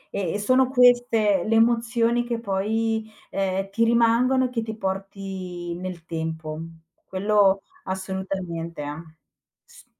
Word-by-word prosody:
E 185 -5 -1
e - - 0
sono 255 +4 +3
queste 245 -6 +4
le 225 +1 +1
emozioni 235 +1 +3
che 240 -1 -3
poi, 220 +2 -1 0.2
ehm, 195 0 -1
ti 230 +3 +1
rimangono 235 +3 +3
e 255 - -2
che 235 -2 -2
ti 220 -1 -5
porti 190 -3 -5
nel 180 -2 -7
tempo. 160 -1 -4 0.5
Quello 195 0 +3 0.2
assolutamente 190 -4 -4
ah 150 +3 -6 0.6
S 485 +1 -18
200 Hz, 125 wpm, -24 LUFS, 185-230 Hz, 0.6 s, queste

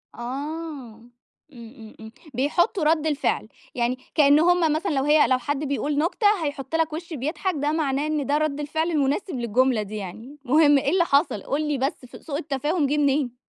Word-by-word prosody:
آه، - - -13
امم 270 -3 -7 0.4
امم 230 -1 -12
امم، 220 0 -10 0.2
بيحُطُّوا 315 - +1
رد 315 0 +2
الفعل، 295 -1 -1 0.3
يعني 245 0 0 0.2
كأن 290 -1 +5
هُم 340 -2 +3
مثلًا 335 +4 -1
لو 270 -3 0
هي 295 +1 +4
لو 255 - +3
حد 285 +2 -3
بيقول 285 +1 -2
نكتة 345 +7 +1 0.2
هيحُط 285 0 -4
لك 325 -1 0
وش 335 +1 -6
بيضحك، 305 +6 -2
ده 290 +1 -1
معناه 295 -2 0
إن 305 -2 -1
ده 285 +2 +1
رد 305 -2 -1
الفعل 315 +3 -2
المناسب 295 +3 0
للجملة 240 0 +1
دي 210 +1 -7
يعني. 220 +8 -8
المهم 290 +2 +5
إيه 275 - 0
اللي 350 -1 +3
حصل؟ 280 - +1
قُل 300 +2 -2
لي 295 -1 0
بس 265 0 -3 0.2
سوء 285 -3 -4
التفاهم 295 +1 -1
جِه 295 +2 0
منين؟ 275 -3 +1
290 Hz, 185 wpm, -24 LUFS, 265-310 Hz, 0.4 s, كأن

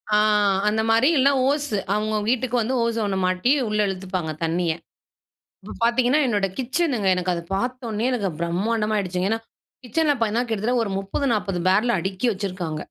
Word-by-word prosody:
ஆ - - +5 0.5
அந்த 220 +1 +2
மாரி 230 +4 +4
இல்லனா 275 +2 +4 0.2
ஓஸ்சு, 285 -7 -1 0.2
அவுங்கங்க 215 0 0
வீட்டுக்கு 250 0 0
வந்து 245 +4 -1
ஓசோ 230 -1 -1
ஒண்ண 190 -1 -1
மாட்டி 185 +8 +1 0.2
உள்ள 210 0 -1
இழுத்துப்பாங்க 185 -4 -3
தண்ணிய. 165 +1 0 0.9
இப்ப - - -8
பாத்தீங்கன்னா 245 +4 +3
என்னோட 205 -4 +1
கிச்சனுங்க, 260 - 0
எனக்கு 180 0 -1
அத 170 - -3
பாத்த 245 +3 -3
உடனே 215 +2 -2
எனக்கு 205 -6 -1
பிரம்மாண்டமா 210 +5 0
ஆகிடுச்சுங்க. 185 -1 -1
ஏன்னா 225 - 0 0.4
கிட்சன்ல 295 +4 +1
பாத்தீங்கன்னா, 230 +2 0
கிட்டத்தட்ட 230 +3 0
ஒரு 205 - -4
30, 195 +8 -2
40 195 -4 -2
பேரல் 215 +4 +3
அடுக்கி 190 +6 -2
வச்சிருக்காங்க. 180 -5 -4
215 Hz, 165 wpm, -23 LUFS, 190-245 Hz, 0.9 s, ஆ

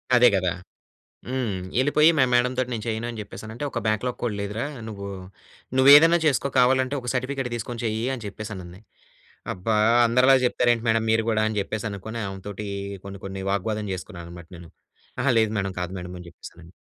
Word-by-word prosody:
అదే 125 0 +7
గదా! 90 -2 +1 0.8
హ్మ్. 125 -7 -2 0.2
ఎళ్ళిపోయి 150 +4 +5
మా 130 - +5
మేడం 125 +1 +3
తోటి 130 -1 0
"నేను 110 -2 -4
చేయను" 115 +1 -2
అని 115 -2 -6
జెప్పేసనంటే, 110 +5 -8
"ఒక 115 - -2
బ్యాక్‌లాగ్ 110 +4 -1
కూడా 115 -4 -1
లేదురా. 105 +5 -3 0.2
నువ్వూ, 100 -2 -6 0.7
నువ్వు 130 +1 +6
ఏదైనా 165 +3 +7
చేసుకో. 140 -2 +2
కావాలంటే 130 +2 +3
ఒక 125 - -4
సర్టిఫికేట్ 130 0 -2
తీసుకొని 120 +1 -5
చెయ్యి" 110 +1 -1
అని 120 -4 -6
చెప్పేసనంది. 100 -3 -8 0.7
అబ్బా! 110 +5 -1 0.3
అందరిలా 125 +3 +5
జెప్తారు 120 0 +2
ఏంటి 115 0 -5
మేడం 110 0 +2
మీరు 110 0 +2
గూడా 110 -1 +2
అని, 110 - -4
జెప్పేసనుకోని. 110 +1 -5
ఆమె 95 0 -8
తోటీ 105 +1 -6 0.4
కొన్ని, 100 0 -8
కొన్ని 95 0 -5
వాగ్వాదం 105 +1 -2
చేసుకున్నాను 90 -2 -8
అనమాట 85 -1 -11
నేను. 85 -1 -12 0.5
అహా! 130 +1 +2
లేదు 110 -1 +2
మేడం 95 -1 -3
కాదు 90 - -4
మేడం 90 0 -8
అని 90 - -11
జెప్పేసాను. 85 0 -13
110 Hz, 180 wpm, -24 LUFS, 100-125 Hz, 0.8 s, అదే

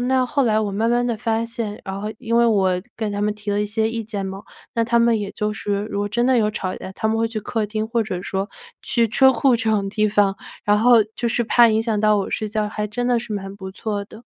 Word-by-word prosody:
那 260 -1 +2
后 280 +2 +1
来 220 -4 +2
我 210 -2 -1
慢 220 +4 +1
慢 240 0 +2
地 235 -2 -1
发 225 0 -1
现 230 -2 -5
然 195 0 -5
后 215 +1 -3
因 230 0 -1
为 235 - +5
我 200 -5 +3 0.2
跟 215 -2 -2
他 205 - -2
们 210 0 +1
提 210 -1 -5
了 205 - +1
一 - - +1
些 220 +1 0
意 230 0 -3
见 205 -3 -4
嘛， 195 +1 -6 0.3
那 230 - +2
他 235 +1 +2
们 235 -2 +3
也 200 -1 -4
就 210 0 -2
是， 205 -1 -2
如 200 -1 -3
果 205 - -1
真 240 +4 +1
的 260 -1 +4
有 215 -2 +2
吵 185 -3 -3
架， - - -8
他 190 - -3
们 220 +1 +1
会 225 0 +1
去 225 -1 -4
客 215 +1 -2
厅 215 +1 -2
或 230 0 0
者 190 -4 -4
说 195 +2 -3 0.3
去 235 -1 +2
车 265 +4 +5
库 255 +2 +3
这 225 -1 0
种 200 -2 +1
地 215 +1 +1
方， 205 -1 +2 0.3
然 205 0 +4
后 230 0 +5
就 235 - -1
是 235 +1 0
怕 235 +1 +6
影 220 0 +2
响 225 -2 -1
到 215 0 +4
我 200 - -2
睡 215 - -2
觉， 210 0 -1
还 210 0 -3
真 245 +4 -2
的 245 -1 +3
是 235 -2 -7
蛮 195 -1 -5
不 190 -1 -8
错 205 +1 -4
的。 220 +3 -14
215 Hz, 300 characters per minute, -21 LUFS, 205-230 Hz, 0.3 s, 怕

